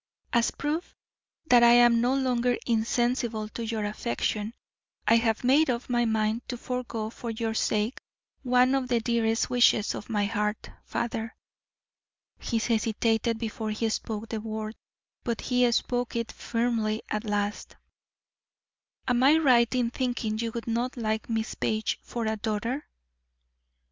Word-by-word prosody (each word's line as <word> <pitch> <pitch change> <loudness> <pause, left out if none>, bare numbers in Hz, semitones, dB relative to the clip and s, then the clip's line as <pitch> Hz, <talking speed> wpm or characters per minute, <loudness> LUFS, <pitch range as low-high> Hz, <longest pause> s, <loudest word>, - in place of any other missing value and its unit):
"As 235 -1 +3
proof 305 +4 -3 0.5
that 245 -5 +6
I 235 0 +7
am 240 -1 +6
no 250 +2 +2
longer 250 -2 +1
insensible 235 -1 0
to 230 - -6
your 220 -2 -2
affection, 210 - -2 0.5
I 230 - +6
have 225 -1 0
made 280 +5 +4
up 245 0 -2
my 240 -1 +2
mind 220 0 0
to 245 - -3
forego 235 -3 -4
for 235 - -7
your 225 0 -2
sake 220 +2 0 0.4
one 250 0 +3
of 265 -2 0
the 240 -2 +2
dearest 225 -1 0
wishes 240 -4 +4
of 210 - -7
my 210 -3 +1
heart. 210 0 -2
Father" 230 0 -3 1.0
he 230 - -1
hesitated 225 0 +1
before 220 -1 -4
he 220 +1 -1
spoke 220 0 -4
the 220 -2 -3
word, 215 0 -4 0.5
but 235 -2 -2
he 250 -1 +2
spoke 245 +1 -1
it 230 -1 -2
firmly 230 -2 -1
at 215 +1 -1
last, 205 -1 -2 1.3
"am 245 -1 +2
I 285 +4 +6
right 250 -7 +4
in 240 -2 +1
thinking 240 -4 -2
you 230 0 -2
would 235 - -4
not 240 +3 -2
like 220 -1 -2
Miss 225 -1 -1
Page 215 0 -1
for 235 -2 -4
a 220 0 -1
daughter?" 230 +6 -2
230 Hz, 150 wpm, -27 LUFS, 220-245 Hz, 1.3 s, I